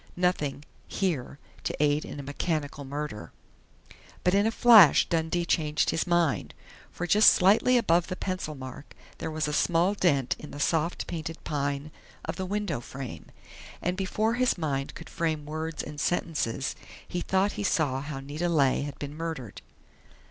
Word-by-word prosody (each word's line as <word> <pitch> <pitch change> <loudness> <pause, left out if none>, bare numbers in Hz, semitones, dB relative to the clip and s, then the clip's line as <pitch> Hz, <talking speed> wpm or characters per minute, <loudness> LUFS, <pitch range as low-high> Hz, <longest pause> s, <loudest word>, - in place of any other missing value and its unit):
Nothing 150 -6 0 0.2
here 155 -9 -2 0.3
to - - -2
aid 150 0 +2
in - - -7
a - - -5
mechanical 145 0 -3
murder 140 -5 -5 0.9
But 180 - +3
in 200 +2 +4
a - - +1
flash 220 - +7
Dundee 165 +1 0
changed 150 -2 +1
his 165 - -1
mind. 175 -5 +1 0.3
For 175 - -4
just 210 +5 +7
slightly 215 +7 +4
above 175 -7 +3
the 185 - -4
pencil 185 -5 -4
mark 130 +1 -10 0.2
there - - -3
was 155 -1 -1
a 150 - -2
small 175 +5 +2
dent 145 -10 +1
in 150 - -9
the 145 - -9
soft 165 +3 0
painted 165 -1 -6
pine 145 0 -2 0.3
of - - -3
the 190 -1 -4
window 205 - -2
frame. 135 0 -8 0.5
And 180 +1 -1
before 210 +4 0
his 250 -2 +2
mind 140 -5 -2
could - - -9
frame 160 -3 -2
words 155 +2 -4
and 150 -1 -6
sentences 145 -7 -1 0.3
he 175 - -3
thought 190 +3 +1
he 205 - -4
saw 145 -8 +1
how 145 -1 -5
Nita 150 +6 -3
Leigh 140 -6 +3
had 145 0 -5
been 145 0 -6
murdered. 160 - -5
160 Hz, 165 wpm, -28 LUFS, 145-180 Hz, 0.9 s, flash